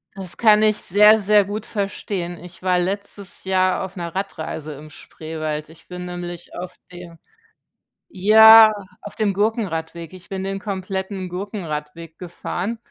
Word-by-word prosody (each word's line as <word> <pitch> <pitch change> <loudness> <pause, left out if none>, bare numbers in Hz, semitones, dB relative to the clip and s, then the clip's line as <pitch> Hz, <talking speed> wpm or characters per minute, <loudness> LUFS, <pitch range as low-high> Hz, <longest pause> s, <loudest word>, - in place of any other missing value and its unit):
Das 190 -2 -7
kann 215 -2 +5
ich 215 -1 +3
sehr, 210 +3 +5
sehr 205 0 +4
gut 210 +1 -5
verstehen. 195 -4 -4
Ich 180 +1 -13
war 180 -1 +2
letztes 200 0 -5
Jahr 185 0 +1
auf 190 +1 -8
'ner 170 0 -6
Radreise 160 -5 -5
im 150 +2 -12
Spreewald. 155 0 -6
Ich 160 - -18
bin 180 0 -7
nämlich 175 -1 -7
auf 180 0 -7 0.2
dem 175 -2 -12 0.9
ja, 220 +3 +8 0.3
auf 205 - -9
dem 210 -3 0
Gurkenradweg, 170 -6 -2
ich 185 +1 -14
bin 190 -1 -4
den 195 0 -3
kompletten 190 -1 -4
Gurkenradweg 165 -4 -6
gefahren. 180 +4 -5
185 Hz, 145 wpm, -21 LUFS, 170-205 Hz, 0.9 s, ja